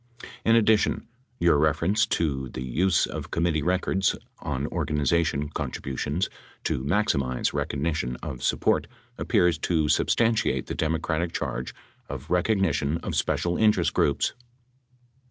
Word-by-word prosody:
In 115 - +4
addition, 110 -1 +3 0.3
your 85 -4 +4
reference 85 +9 +2
to 70 - -1
the 65 - -6
use 80 +8 +2
of - - -6
committee 85 -2 0
records 95 +3 +1 0.2
on 70 -1 -3
organization 75 0 0
contributions 70 +3 -3 0.4
to 65 - -1
maximize 70 - 0
recognition 70 -3 -1
of 60 - -5
sup - - 0
port - - +2 0.3
appears 90 -8 +2
to 80 -4 +1
substantiate 115 +6 +2
the - - -5
Democratic 80 +1 -1
charge 65 +1 -3 0.3
of 70 +2 -7
recog 90 +4 +2
nition 80 -3 +1
of - - -3
special 85 0 0
interest 110 -1 +3
groups. 70 - +1
80 Hz, 125 wpm, -26 LUFS, 70-90 Hz, 0.4 s, In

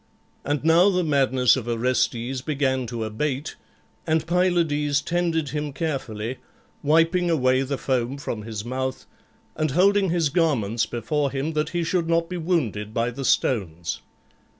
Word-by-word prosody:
And 145 0 -1
now 165 +4 +5
the 180 -2 +1
madness 130 -5 +3
of 125 -3 -5
Orestes 120 +1 0
began 130 -3 0
to 115 -1 -4
abate, 130 +6 -3 0.5
and 160 0 +1
Pylades 165 -5 +2
tended 165 -1 -1
him 150 +1 -3
carefully, 130 -6 -3 0.4
wiping 165 +4 +3
away 130 -5 +3
the 135 +1 -2
foam 130 0 -1
from 120 -6 -4
his 110 0 -6
mouth 130 +1 -3 0.5
and 155 0 0
holding 195 +6 +3
his 165 -3 +1
garments 135 - +1
before 140 +5 -1
him 140 +4 -3
that 150 0 0
he 175 -1 -1
should 165 0 0
not 165 0 +1
be 180 - -4
wounded 125 - -1
by 115 +1 +1
the 135 +3 -6
stones. 90 -10 0
140 Hz, 150 wpm, -24 LUFS, 125-165 Hz, 0.5 s, now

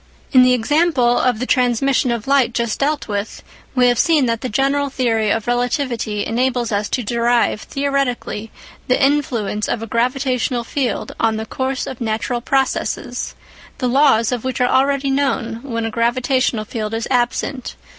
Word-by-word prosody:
In 255 - +7
the 250 0 +5
example 255 -1 +2
of 250 -3 +1
the 250 - -3
transmission 255 +1 +2
of 235 -2 -2
light 270 -4 +2
just 235 -2 -1
dealt 290 +1 0
with, 205 0 -4 0.3
we 250 -1 +4
have 245 -1 +3
seen 310 -5 +3
that 230 -2 -1
the 255 - -3
general 275 +4 +1
theory 230 -5 0
of 225 +1 0
relativity 245 -4 -1
enables 245 0 0
us 205 0 -1
to 250 - -1
derive 235 0 +1
theoretically 275 -6 -2 0.4
the 255 - +2
influence 250 -7 0
of 225 - -2
a - - -3
gravitational 250 +1 0
field 255 +1 -2
on 225 -1 +1
the 220 - -4
course 260 +2 -3
of 260 -2 -7
natural 230 +2 -2
processes, 270 +2 -1 0.4
the 250 - -1
Iaws 250 -4 +3
of 245 -3 -2
which 260 -1 -3
are 250 - +3
already 275 +1 +2
known 265 -5 -1
when 230 -4 -3
a 225 - -3
gravitational 240 0 0
field 215 0 -4
is 225 - -3
absent. 250 +1 -1
245 Hz, 165 wpm, -19 LUFS, 230-270 Hz, 0.4 s, In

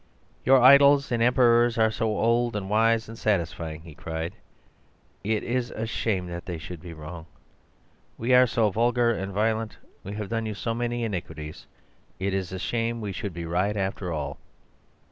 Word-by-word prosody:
"'Your 135 +1 +6
idols 140 +2 +7
and 120 -1 +1
emperors 120 -1 +4
are 110 -1 +3
so 110 -1 -1
old 115 0 +2
and 100 -1 -4
wise 115 +1 +3
and 115 - -8
satisfying,' 85 -7 -2
he 80 -2 -12
cried, 80 +2 -5 0.9
'it 110 +1 0
is 120 0 -1
a 110 - -4
shame 110 -4 -1
that 85 0 -7
they 90 -2 -4
should 80 +1 -8
be 85 - -9
wrong. 80 +2 -9 0.9
We 120 +3 +1
are 125 0 +7
so 110 -2 +1
vulgar 120 +3 +2
and 95 -3 -3
violent, 110 +2 -1 0.3
we 100 - -6
have 105 -1 -5
done 115 -1 -2
you 105 - -4
so 115 +2 -2
many 120 0 -2
iniquities— 80 -7 -6 0.5
it 95 +1 -2
is 95 -2 -2
a 95 - -4
shame 115 +4 -2
we 105 -3 -4
should 100 +1 -4
be 85 -1 -5
right 90 +5 0
after 95 -2 -2
all. 70 -3 -4
110 Hz, 180 wpm, -26 LUFS, 90-115 Hz, 0.9 s, idols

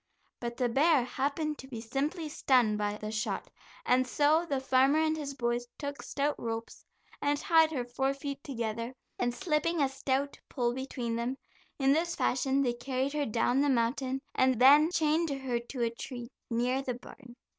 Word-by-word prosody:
But 235 -1 -5
the 250 - +2
bear 280 +3 +4
happened 290 +4 -2
to 265 - -9
be 240 -4 -6
simply 290 +8 -2
stunned 245 -7 +2
by 205 0 -1
the 215 0 -5
shot, 215 +1 -3 0.3
and 255 +1 +3
so 305 +6 +3
the 275 - +1
farmer 265 +2 +3
and 315 0 +2
his 285 -3 -5
boys 240 -1 -1
took 285 0 -5
stout 290 +1 -1
ropes 225 0 -5 0.4
and 290 0 +1
tied 320 +1 +4
her 255 -6 -2
four 265 +3 -1
feet 280 0 -6
together 235 -3 -4 0.2
and 245 0 +1
slipping 335 +2 0
a 280 - +4
stout 270 +1 -2
pole 240 -3 0
between 245 -3 -3
them, 245 +3 -2 0.4
in 270 -1 +4
this 340 +3 0
fashion 270 +2 +1
they 245 -2 +1
carried 260 +3 -2
her 295 -1 0
down 240 +4 +2
the 290 - +2
mountain, 260 +2 0
and 260 -2 +3
then 290 +5 +7
chained 320 -1 +1
her 265 -3 -2
to 240 +1 -4
a 230 - +1
tree 240 0 -7 0.2
near 250 +3 +1
the 255 -3 -3
barn. 245 0 -13
265 Hz, 180 wpm, -30 LUFS, 240-290 Hz, 0.4 s, then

